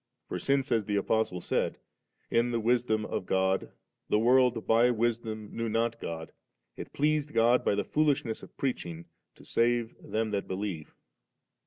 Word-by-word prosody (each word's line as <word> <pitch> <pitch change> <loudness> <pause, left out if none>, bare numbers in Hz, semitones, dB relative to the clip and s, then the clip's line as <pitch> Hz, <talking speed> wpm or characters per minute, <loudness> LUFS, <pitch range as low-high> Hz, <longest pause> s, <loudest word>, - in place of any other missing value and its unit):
For - - -4
since, 135 -1 0
as 115 -3 +2
the 105 - -1
Apostie 100 -2 0
said, - - 0 0.3
' - - -43
in 120 +1 +3
the 120 -1 0
wisdom 115 -2 +1
of 90 - -4
God 95 0 +1 0.4
the - - +3
world 120 0 +3
by 115 +2 +4
wisdom 115 -2 -2
knew 115 0 -2
not 115 +1 0
God, 80 -1 -5 0.4
it - - -8
pleased 150 0 0
God 120 +2 +4
by - - +2
the 100 - 0
foolishness 145 -7 +1
of - - -14
preaching 85 -11 -3 0.3
to - - -17
save 120 0 +1
them 110 0 -2
that 100 -1 -2
believe^.' 95 -5 -4
115 Hz, 165 wpm, -29 LUFS, 105-120 Hz, 0.4 s, by